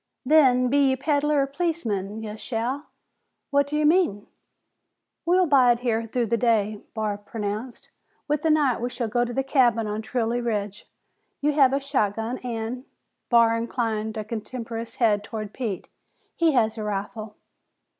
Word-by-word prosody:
"Then, 255 -4 +5
be 280 +1 +3
ye 265 - +2
peddler 290 +1 +1
or - - 0
policeman, 230 - -2
you 210 -1 -6
shall." 245 +6 -3 0.6
"What 285 0 +3
do 295 - -4
you 305 - +2
mean?" 305 - +2 1.0
"We'll 365 +1 +4
bide 250 -6 +4
here 230 -2 0
through 240 +1 0
the 230 +1 0
day," 215 -3 +1
Barr 210 -2 -2
pronounced. 215 +3 -5 0.4
"With 300 0 0
the 320 - +1
night 290 -7 +2
we 245 - -1
shall 240 -1 -3
go 240 +3 +1
to 240 +2 -3
a - - +1
cabin 245 -5 +3
on 210 +1 -3
Trilley 235 +1 -1
Ridge. 210 -3 -3 0.5
You 295 +1 +2
have 275 -3 +5
a 275 - +1
shotgun 230 -4 -1
an'," 240 +1 -4 0.4
Barr 230 -1 +5
inclined 225 -2 -2
a 215 - -2
contemptuous 230 +1 -6
head 210 -4 +2
toward 215 -1 -6
Pete, 220 -8 -4 0.5
"he 330 -2 +3
has 225 -3 +1
a - - -3
rifle. 210 +1 -4
235 Hz, 160 wpm, -25 LUFS, 220-270 Hz, 1.0 s, Then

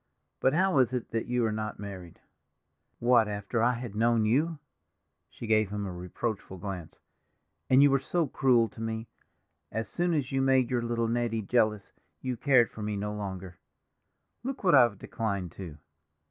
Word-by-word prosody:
But 130 - +2
how 185 -4 +3
is 130 -1 +3
it 125 -2 -3
that 115 0 -2
you 125 -1 +1
are 110 - 0
not 110 0 -4
married?" 95 -4 -9 0.8
"What, 120 -2 +4
after 105 +2 -2
I 120 +2 +3
had 120 -3 -6
known 115 +1 +2
you?" 150 +9 +1 0.7
She - - -9
gave 110 -2 +2
him 105 0 -3
a 95 - -5
reproachful 95 +3 -5
glance. 90 -3 -7 0.7
"And 130 +2 +6
you 145 - +6
were 135 - +3
so 165 +5 0
cruel 125 -4 +3
to 110 - -11
me—as 110 0 -7
soon 175 -1 0
as 140 -3 -1
you 135 0 +1
had - - +1
made 130 -2 +3
your 125 -1 +1
little 115 0 -1
Nettie 115 -1 -1
jealous 110 -2 +1 0.3
you 130 -1 -3
cared 125 -1 +3
for 110 - -9
me 105 -1 -2
no 105 +1 -3
longer. 95 -3 -6 0.8
Look 265 0 -5
what 180 - +4
I've 120 -7 +6
declined 100 -5 -3
to!" 85 -5 -9
115 Hz, 175 wpm, -29 LUFS, 105-130 Hz, 0.8 s, And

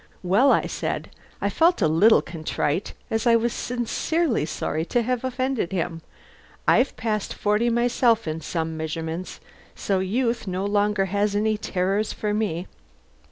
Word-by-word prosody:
"Well," 200 +10 +4
I - - +3
said - - -3 0.3
(I - - +1
felt 340 +2 +3
a 175 - +3
little 170 +9 +5
contrite, 155 +1 -2 0.2
as 225 +2 0
I 230 - +6
was 230 +1 +1
sincerely 245 - -1
sorry 155 0 -2
to 240 +5 +1
have 250 +1 -1
offended 255 -6 -1
him), 170 -3 -2 0.7
"I've 260 - +3
passed 215 -3 -2
forty 210 +3 +1
myself 235 -2 +2
in 155 +1 -3
some 160 +1 -3
measurements, 160 +2 -4 0.4
so 195 -2 0
youth 230 +4 -1
no 185 +1 -2
longer 205 -1 +1
has 205 0 +1
any 215 +1 +2
terrors 200 +1 -1
for 210 -1 -2
me." 190 -5 -1
210 Hz, 150 wpm, -24 LUFS, 180-235 Hz, 0.7 s, I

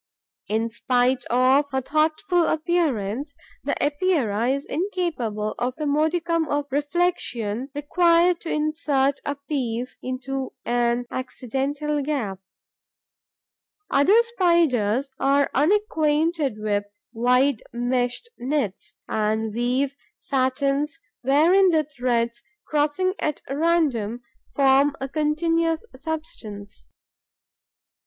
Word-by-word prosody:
In 225 +2 -1
spite 250 +2 +1
of 260 +4 +3
her 265 -1 -1
thoughtful 315 +5 +1
appearance, 285 - -1 0.3
the 285 - -1
Epeira 285 - +1
is 275 +1 -1
incapable 300 - -2
of 250 +1 -1
the 305 - -4
modicum 320 +3 +1
of 290 0 -1
reflexion 280 -6 -1
required 340 +3 +3
to 330 - -6
insert 300 -3 +1
a 285 - -1
piece 255 -4 -3
into 260 +1 -4
an 240 0 +1
accidental 275 +4 -2
gap. 260 -10 -2 1.5
Other 365 +11 +5
Spiders 300 - +2
are 280 +1 +2
unacquainted 310 - +1
with 205 -1 -1 0.3
wide 250 +2 +2
meshed 245 - -1
nets 255 -7 -3
and 220 0 -1
weave 250 +4 0 0.3
satins 275 +3 0 0.2
wherein 330 +9 +5
the 320 -3 +3
threads, 240 -4 -1 0.2
crossing 305 +5 +1
at 300 - -2
random, 275 -7 0 0.3
form 275 +1 +4
a 270 - -3
continuous 325 - 0
substance. 220 - -7
280 Hz, 95 wpm, -24 LUFS, 245-315 Hz, 1.5 s, Other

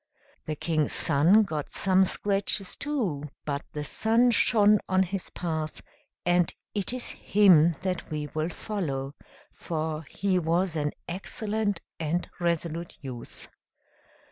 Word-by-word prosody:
The 155 - -2
King's 155 -1 0
Son 175 +10 +5
got 155 -7 -4
some 190 0 +3
scratches 195 0 -1
too; 200 - -2 0.2
but 140 -1 -2
the 150 - -3
sun 230 +9 +3
shone 210 -2 +5
on 190 0 +4
his 190 0 -4
path, 160 -3 -3 0.5
and 175 -1 +3 0.2
it 205 0 0
is 250 -1 -4
him 180 -5 +5
that 185 -2 -2
we 150 -1 -3
will 155 +2 -1
follow, 145 -9 -3 0.4
for 155 -1 -3
he 190 -2 +1
was 170 +1 +1
an 150 -1 -1
excellent 205 +2 -2 0.2
and 165 +2 -1
resolute 170 -1 -2
youth. 125 -4 -8
175 Hz, 125 wpm, -27 LUFS, 155-200 Hz, 0.5 s, Son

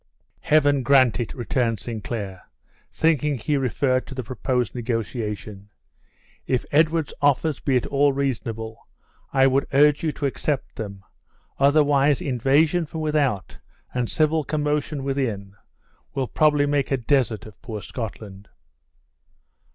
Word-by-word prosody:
"Heaven 145 -2 +3
grant 130 -2 +4
it!" 120 - -4
returned 120 -2 -1
Sinclair, 105 -4 -5 0.5
thinking 150 -3 +1
he 145 +6 -1
referred 130 0 0
to 135 - -8
the 130 - -4
proposed 125 +1 -2
negotiation. 110 -4 -4 0.8
"If 130 -2 0
Edward's 160 +1 +2
offers 145 +1 +2
be 135 -3 +1
at 125 - -1
all 140 0 +3
reasonable, 115 -4 -4 0.4
I 135 -1 +4
would 135 +1 +2
urge 145 +1 +5
you 160 - +1
to 145 - -4
accept 140 +1 -2
them; 100 -3 -7 0.6
otherwise 145 0 +4
invasion 150 +6 +2
from 160 +1 -5
without, 145 -10 -1 0.3
and 125 -2 -1
civil 155 0 +2
commotion 150 -1 -1
within, 115 -8 -2 0.6
will 135 -2 -1
probably 150 0 +3
make 145 -1 0
a 135 - +1
desert 120 -4 0
of 110 -3 -14
poor 115 -3 -6
Scotland." 100 -3 -7
135 Hz, 130 wpm, -23 LUFS, 115-145 Hz, 0.8 s, urge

